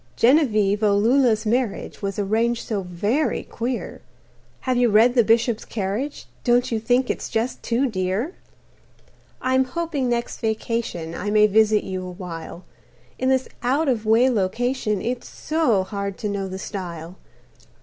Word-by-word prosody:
"Genevieve 215 -6 +3
O 205 -2 +3
loola's 230 0 +3
marriage 230 -2 -1
Was 200 -1 -3
arranged 225 +4 0
so 210 -3 -1
very 205 - -1
queer 245 +1 -4 0.6
Have 255 -1 0
you 245 -1 +3
read 225 +4 +5
'The 240 -2 +5
Bishop's 225 +1 +2
Carriage'? 220 +8 -3 0.2
Don't 245 0 +2
you 225 - 0
think 245 +3 +2
it's - - -5
just 225 +3 -2
too 245 +3 +1
dear? 205 - -1 1.1
"I 260 - +1
am 260 0 +4
hoping 285 -1 -2
next 240 0 -2
vacation 220 -7 -2
I 195 +4 -3
may 210 0 +5
visit 215 0 +3
you 185 -1 -4
a 185 - -6
while. 175 -1 -8 0.6
In 260 - +1
this 260 0 +2
out 275 +6 +1
of 240 -5 +1
way 230 +4 +5
location 230 0 0
It's 245 +1 -3
so 305 -12 +1
hard 200 0 -4
to 210 - -3
know 200 -1 -2
the 190 0 -6
style. 175 -3 -6
225 Hz, 155 wpm, -23 LUFS, 200-250 Hz, 1.1 s, read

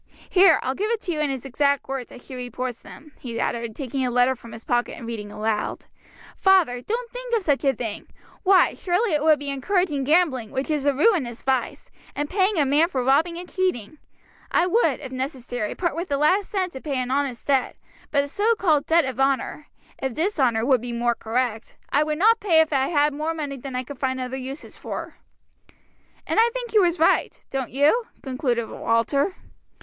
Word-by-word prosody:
Here, 375 +1 +6
I'll 260 - -1
give 410 +9 -2
it 465 -1 0
to 360 - -3
you 310 - -2
in 300 -1 +1
his 265 -2 -4
exact 280 +1 +1
words, 270 -2 -5
as 250 - -13
she - - -10
reports 250 -1 -5
them," 300 +1 -14
he 235 -3 -5
added, 235 -2 -2
taking 270 -1 -3
a 250 - +1
letter 250 +2 +3
from 230 -2 -13
his 225 - -10
pocket 240 0 -1
and 235 - -8
reading 215 -3 -6
aloud, 215 0 -2 0.5
"'Father, 355 -11 +3
don't 470 - -3
think - - -3
of 440 - 0
such 290 -4 +1
a 270 -2 +2
thing! 225 -3 -5 0.3
Why, 385 -1 +5
surely 370 +2 0
it 300 - +2
would 310 0 +5
be 285 0 -4
encouraging 295 0 0
gambling, 280 -6 +2
which 270 +3 -3
is 290 -2 0
a 285 - +4
ruinous 285 - +1
vice; 265 -2 -1 0.2
and 290 0 -3
paying 385 +1 +2
a 295 - +3
man 290 +5 +4
for 260 -8 -1
robbing 310 +7 +2
and 355 +1 -7
cheating. 310 - -2 0.5
I 350 - +3
would, 440 +7 +2
if 260 - -7
necessary, 255 -4 -4
part 345 -3 -1
with 340 +3 -3
the 280 - +1
last 365 +7 +2
cent 375 -3 -1
to 265 - -8
pay 285 -4 -3
an 250 0 -2
honest 270 -3 -1
debt; 270 -3 +1 0.3
but 280 -1 +2
a - - -5
so 425 +10 +1
called 310 -7 +2
debt 330 0 +4
of 260 -1 -5
honor 275 +2 0 0.3
(of 265 -3 -3
dishonor 265 - +1
would 260 -3 +3
be 245 0 -5
more 240 0 +1
correct) 230 0 -3
I 290 - +3
would 305 0 -2
not 445 +6 +4
pay 350 -7 +4
if 315 -1 +3
I 270 -1 +2
had 295 -2 +2
more 310 +3 -2
money 290 -3 -4
than 265 0 -7
I 255 - -1
could 275 0 -10
find 260 -1 -1
other 255 0 -4
uses 265 +2 -7
for.' - - -7 1.1
And - - +1
I 465 - +4
think - - -5
he 430 - +5
was 350 -2 +3
right. 325 - +2
Don't 265 -2 -2
you?" 300 - +3 0.2
concluded 255 -4 -1
Walter. 275 - 0
280 Hz, 210 wpm, -24 LUFS, 255-345 Hz, 1.1 s, Here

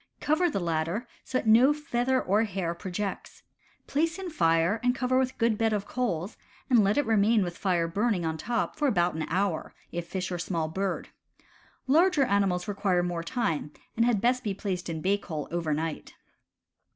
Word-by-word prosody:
Cover 330 +4 +2
the 285 - -2
latter 170 +6 -1 0.2
so 260 - -2
that - - -3
no 235 +6 +6
feather 260 -3 0
or 205 0 +2
hair 190 -5 -2
projects. 190 +3 -5 0.4
Place 325 +4 0
in 380 -2 -5
fire 165 - +2
and 245 0 +2
cover 255 0 +1
with 260 0 -1
good 230 -2 +1
bed 225 -1 +2
of 205 -1 -1
coals 210 -6 -2 0.3
and 235 -4 +6
let 200 +5 +2
it 290 - +2
remain 220 0 +3
with 175 -1 -4
fire 180 -4 0
burning 200 0 0
on 160 0 -1
top 230 +9 -2
for 300 -1 +1
about 175 -8 +2
an 160 0 -3
hour, 185 -1 -1 0.2
if 170 0 -4
a - - -27
fish 185 -1 -3
or 175 - -3
small 165 -2 -1
bird. 190 +4 -3 0.8
Larger 320 +2 +4
animals 200 -5 +1
require 195 -3 +1
more 175 -1 -2
time, 165 - -2 0.2
and 230 - +3
had 230 -4 +2
best 250 +2 +2
be 205 -4 -2
placed 185 -3 -3
in 160 -1 -4
bake 200 +3 0
hole 155 -5 -4
over 170 -2 -1
night. 155 +1 -3
200 Hz, 190 wpm, -28 LUFS, 175-245 Hz, 0.8 s, no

